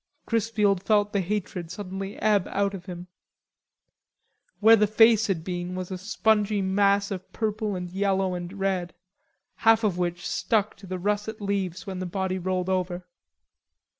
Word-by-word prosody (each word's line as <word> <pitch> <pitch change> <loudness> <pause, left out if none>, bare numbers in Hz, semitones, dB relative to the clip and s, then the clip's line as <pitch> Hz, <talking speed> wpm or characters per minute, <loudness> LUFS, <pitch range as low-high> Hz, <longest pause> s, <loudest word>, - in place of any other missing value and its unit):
Chrisfield 210 -4 +1
felt 205 0 +2
the 200 - +2
hatred 185 -2 -3
suddenly 195 +1 -6
ebb 210 -4 +2
out 200 0 0
of 190 -1 -8
him. 175 -1 -7 1.5
Where 225 +2 +8
the 210 -1 +3
face 225 +1 +5
had 180 -5 -1
been 180 0 -4
was 185 0 -5
a 185 - -3
spongy 210 0 +1
mass 200 +1 +2
of 190 -2 -6
purple 215 -2 -2
and 180 -1 -4
yellow 190 0 0
and 175 0 -5
red, 190 -3 -2 0.6
half 225 0 +4
of 190 -4 +1
which 175 0 -2
stuck 215 -2 0
to 195 - -13
the 185 0 -3
russet 210 +4 -2
leaves 195 -3 -2
when 190 -2 -5
the 185 - -3
body 190 +1 -2
rolled 185 0 -1
over. 185 -1 -1
195 Hz, 160 wpm, -26 LUFS, 185-210 Hz, 1.5 s, Where